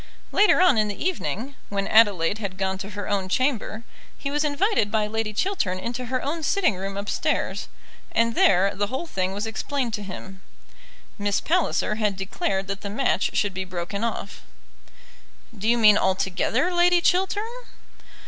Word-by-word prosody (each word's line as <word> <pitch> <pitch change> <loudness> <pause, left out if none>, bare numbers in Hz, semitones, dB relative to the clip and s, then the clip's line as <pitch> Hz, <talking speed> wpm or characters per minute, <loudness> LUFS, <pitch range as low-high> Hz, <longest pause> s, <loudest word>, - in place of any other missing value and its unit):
Later 415 -3 +5
on 350 -11 +5
in 215 - +2
the 205 - -5
evening, 280 - -2 0.2
when 200 -1 -2
Adelaide 205 -3 +4
had 195 -3 -5
gone 190 0 -1
to 200 - -6
her 205 0 -6
own 195 -2 -1
chamber, 235 -2 0 0.3
he 280 - -4
was 295 +1 +1
invited 300 - +1
by 215 0 +1
Lady 220 0 -2
Chiltern 215 - -1
into 240 +6 -4
her 255 +1 -2
own 320 +4 -2
sitting 345 - +2
room 195 +1 -5
upstairs, 200 +1 -1 0.4
and 230 0 +2
there 195 -1 +4
the 205 +2 -1
whole 265 +9 -4
thing 190 - -2
was 205 +3 -3
explained 240 +2 -2
to 210 - -2
him. 190 -1 -9 0.8
Miss 205 0 +1
Palliser 320 -10 0
had 210 -2 +1
declared 195 0 -2
that 195 +1 -5
the 200 - -5
match 210 -2 0
should 205 -2 +1
be 190 +1 -3
broken 185 +3 -4
off. 225 -3 -4 1.1
"Do 215 +2 -2
you 240 - +4
mean 210 -2 +6
altogether, 190 - +1
Lady 350 0 +4
Chiltern?" 380 +4 +2
210 Hz, 165 wpm, -24 LUFS, 195-270 Hz, 1.1 s, mean